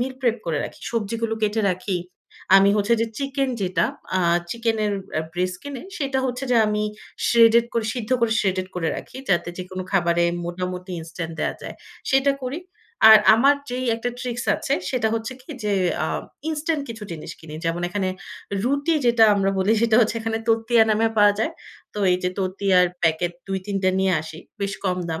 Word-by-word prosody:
Meal 260 +2 -1
prep 240 -3 +2
করে 155 -3 0
রাখি, - - -9
সবজিগুলো 230 0 -2
কেটে 215 +1 +1
রাখি, 185 0 -2 0.6
আমি 195 +1 +6
হচ্ছে 210 +3 +2
যে 230 - +1
চিকেন 275 -1 -1
যেটা 180 -2 +1 0.3
আ - - +2 0.3
চিকেনের 225 -3 0 0.3
আ - - +1
ব্রেস্ট 180 +1 -1
কিনে 285 -3 -7 0.2
সেটা 275 -2 -1
হচ্ছে 250 +2 -3
যে 245 - +4
আমি 210 0 0 0.4
শ্রেডেড 230 0 +6
করে, 230 -2 0
সিদ্ধ 235 -1 -5
করে 230 -1 +2
শ্রেডেড 185 -2 0
করে 165 -3 -1
রাখি, - - -9
যাতে 175 -2 +1
যেকোনো 185 +1 -5
খাবারে 170 -2 +2 0.2
মোটামুটি 180 +1 -5
ইনস্ট্যান্ট 165 +1 -6
দেয়া - - -1
যায়, - - -7 0.4
সেটা 270 +1 +4
করি। 260 +6 -3 0.5
আর 220 - +11 0.2
আমার 275 +5 +5 0.2
যেই 255 +1 -2
একটা 245 +2 -3
ট্রিক্স 245 -1 -4
আছে 275 - -3 0.2
সেটা 235 -4 +1
হচ্ছে 225 +2 -3
কী 260 - -13
যে, 210 - +1 0.3
আ - - -1 0.4
ইনস্ট্যান্ট 310 -1 -1
কিছু 225 -2 -8
জিনিস 155 - -7
কিনি, 155 -2 -10
যেমন 165 +1 -1
এখানে 190 0 -1 0.6
রুটি 285 +5 +1
যেটা 235 -1 +6
আমরা 195 -1 +1
বলি 195 +4 +3
সেটা 230 -2 +4
হচ্ছে 230 0 +1
এখানে 225 0 -2
তরতিয়া 225 +1 +4
নামে 220 +1 +3
পাওয়া 205 -1 +6
যায়। 310 +9 0 0.4
তো - - -5
এই - - +3
যে 180 - +1
তরতিয়ার 185 -1 +2 0.2
প্যাকেট 165 +2 +1 0.2
২-৩ 195 +1 -3
টা 185 - +4
নিয়ে 190 -1 +2
আসি 160 0 -9 0.2
বেশ 200 0 -1
কম 180 -1 +1
দাম। 160 0 -3
215 Hz, 185 wpm, -23 LUFS, 185-235 Hz, 0.6 s, আর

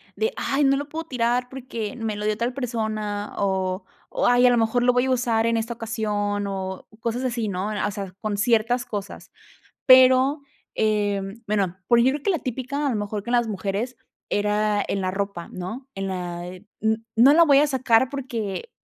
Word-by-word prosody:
de: 450 +3 -1
"Ay, 275 +2 0
no 275 0 +4
lo 285 +1 -5
puedo 325 +2 -5
tirar 245 -2 0
porque 245 -4 -5
me 225 -3 -3
lo 210 0 -4
dio 215 0 0
tal 235 +3 -1
persona", 220 -5 -3
o 190 -1 -1 0.2
o - - 0
"Ay, 245 0 +5
a - - +7
lo 245 - +3
mejor 230 +2 +2
lo 250 - +5
voy 250 +1 +2
a 265 - 0
usar 235 -3 +1
en 230 0 +2
esta 225 +1 -2
ocasión", 210 -3 -2
o 190 -1 -5
cosas 235 +3 -2
así, 235 -3 -1
¿no?, 195 +1 -2 0.2
o - - -3
sea, 195 -2 -6
con 215 -2 -2
ciertas 230 +3 +2
cosas. 205 -2 -7 0.6
Pero, 260 +2 +6 0.3
em, 205 0 -1
bueno, 195 -4 0
por 235 -1 +5
ejemplo, 265 +4 +2
que 400 - +1
la 350 - +1
típica 270 +3 -3
a - - +2
lo 235 - -1
mejor 205 0 -3
que 235 - -6
en - - 0
las 240 -2 +1
mujeres, 210 +5 -3 0.3
era 210 0 +1
en 195 - -1
la 185 - 0
ropa, 195 -2 -4
¿no?, 220 +9 -6
en 195 0 -3
la, 175 -1 -4
eh, 185 +2 -11 0.2
n 220 0 +1 0.2
no 265 +6 +7
la 335 - +7
voy 285 -3 +6
a 295 - +5
sacar 260 -3 +3
porque 255 - -4
225 Hz, 205 wpm, -24 LUFS, 205-255 Hz, 0.6 s, a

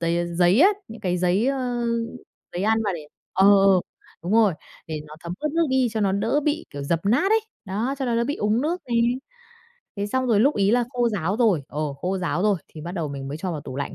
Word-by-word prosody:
giây, 170 0 +1
ơ, 175 - -2
giấy 180 +7 +4
á, 380 - +8 0.2
những 225 +1 -10
cái 180 -1 -1
giấy, 185 +6 +2
ơ, 250 -3 -1 0.7
giấy 180 - -3
ăn 220 +1 +2
mà 205 - 0
để 155 -3 -8 0.3
ờ, 190 +1 +4 0.2
ờ, 190 -2 +5 0.4
đúng 180 +5 -2
rồi, 215 -6 +4 0.3
để 155 -1 -4
nó 150 - -11
thấm 170 0 -6
ướt 305 - -1
nước 335 0 +2
đi 260 -2 +3
cho 220 - -1
nó 195 -2 +2
đỡ 225 +9 +1
bị, 305 +2 0
kiểu, 140 0 -6
dập 165 +3 0
nát 280 - +3
ấy, 445 - +4 0.2
đó, 220 +7 -2
cho 265 - -1
nó 235 -2 0
đỡ 235 - +2
bị 285 +4 -2
úng 210 +3 +1
nước 335 +5 -1
nè. 240 - -1 1.0
Thế 200 +1 -2
xong 260 +4 -1
rồi 215 -4 +3
lúc 280 +5 +4
ấy 200 +1 +2
là 245 0 +3
khô 245 -2 +1
ráo 195 -2 -1
rồi, 215 - +3
ờ, 150 - -4
khô 185 +7 -2
ráo 175 0 -1
rồi, 210 -2 +3
thì 155 - -11
bắt 170 +3 -6
đầu 165 -5 -3
mình 135 -1 -6
mới 145 - -4
cho 180 +3 -3
vào 155 - -4
tủ 130 - -8
lạnh 140 - -4
205 Hz, 260 wpm, -24 LUFS, 175-245 Hz, 1.0 s, á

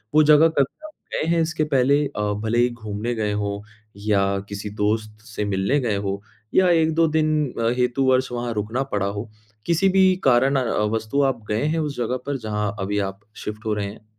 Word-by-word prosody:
वो 155 - +7
जगह 150 +1 +6
कभी 140 - -1
आप 310 - -15 0.2
गए 155 - -1
हैं 170 0 +3
इसके 160 -1 0
पहले? 140 +3 +4
अ, 135 - -8 0.2
भले 110 +1 0
ही 120 +1 +4
घूमने 115 0 -4
गए 105 -2 -1
हो, 100 0 -3 0.3
या 100 -1 +1
किसी 100 +1 -5
दोस्त 105 +1 -2
से 110 -3 -4
मिलने 100 +7 +1
गए 115 -6 0
हो 100 0 -3 0.3
या 185 -1 +5
1-2 165 -1 +3
दिन 155 0 +1 0.3
अ, 115 0 +2
हेतु 125 +2 +1
वर्ष 130 0 +2
वहाँ 120 -1 -3
रुकना 110 +5 -2
पड़ा 100 -1 +1
हो? 100 +3 -5 0.4
किसी 170 +3 +2
भी 190 0 +4
कारण 130 +2 +4
अ, - - 0 0.3
वस्तु 110 +5 0
आप 130 -5 0
गए 105 +4 0
हैं 160 +2 0
उस 150 -2 -2
जगह 125 +1 -1
पर 140 0 -2
जहाँ 105 -1 -2
अभी 100 +1 -1
आप 95 0 -12 0.2
शिफ्ट 105 +1 -6
हो 110 - 0
रहे 105 -1 -2
हैं? 105 +2 -11
120 Hz, 205 wpm, -23 LUFS, 105-145 Hz, 0.4 s, वो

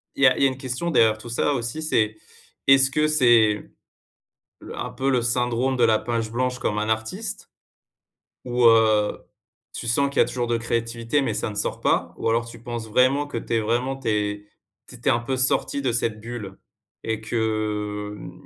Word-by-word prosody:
il - - -1
y - - +9
a - - +4
il - - -2
y - - +7
a - - +1
une 130 - -6
question 135 +6 -3
derrière 110 -7 +4
tout 120 - -10
ça, 130 +5 0
aussi, 125 +5 -3
c'est: 110 -8 +1 0.5
est-ce 135 0 +6
que 150 +3 +2
c'est 120 -8 +3 0.9
le - - -9
un - - -4
peu, 135 +1 -2
le 125 -2 +2
syndrome 120 +2 0
de 120 - +4
la 110 -1 +4
page 115 -2 -2
blanche 125 +1 -1
comme 105 - -1
un 105 +1 -1
artiste? 110 0 -3 1.0
Ou 120 -1 +1
heu, 110 -2 +4 0.5
tu 115 - -5
sens 140 +4 +2
qu'il - - -9
y - - +8
a - - -2
toujours 120 -1 -3
de 120 - +1
la 115 - -1
créativité, 115 +3 -1
mais 125 -5 -1
ça 105 - -2
ne 105 - -8
sort 100 - -2
pas? - - +1
Ou - - -3
alors, 115 +1 +1
tu 115 0 -11
penses 120 -2 -6
vraiment 130 +6 +3
que 145 - -5
tu 115 - -4
es 115 - +3
vraiment, 120 +5 -1
tu 135 -4 -3
es 105 -1 -1 0.4
tu - - -11
étais - - -1
un 120 - +2
peu 130 +2 -3
sortie 130 +2 +1
de 125 -3 0
cette 115 -2 -1
bulle 110 -4 -7 0.5
et 110 -1 -2
que, 105 -2 -2
hem, - - -9
115 Hz, 215 wpm, -23 LUFS, 110-130 Hz, 1.0 s, y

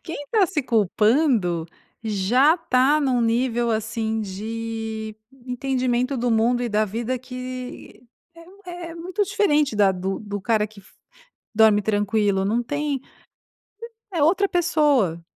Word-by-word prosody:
Quem 330 - -6
está 400 +5 +2
se 330 -5 -2
culpando 215 - +2 0.4
já 225 +8 +3
está 295 -3 +2
num 260 -4 +1
nível, 235 0 +1
assim, 220 0 -2
de 220 +1 -5 0.3
entendimento 255 0 -1
do 245 0 0
mundo 235 +2 +2
e 240 - -1
da 215 0 +1
vida 230 +5 -3
que 255 0 -8 0.3
é 335 - -14
um 390 +3 -18 0.3
é - - -9
muito 360 +5 -2
diferente 305 - +1
da 200 -2 +4
do 190 +1 -3
do 205 -1 -6
cara 215 0 +1
que 215 -1 -16
f 195 - -22 0.6
dorme 215 -1 +5
tranquilo. 205 -1 +1
Não 225 +5 +1
tem, 290 +2 -2 1.1
é 335 -5 0
outra 385 +6 +3
pessoa. 295 - +2
235 Hz, 135 wpm, -23 LUFS, 215-285 Hz, 1.1 s, dorme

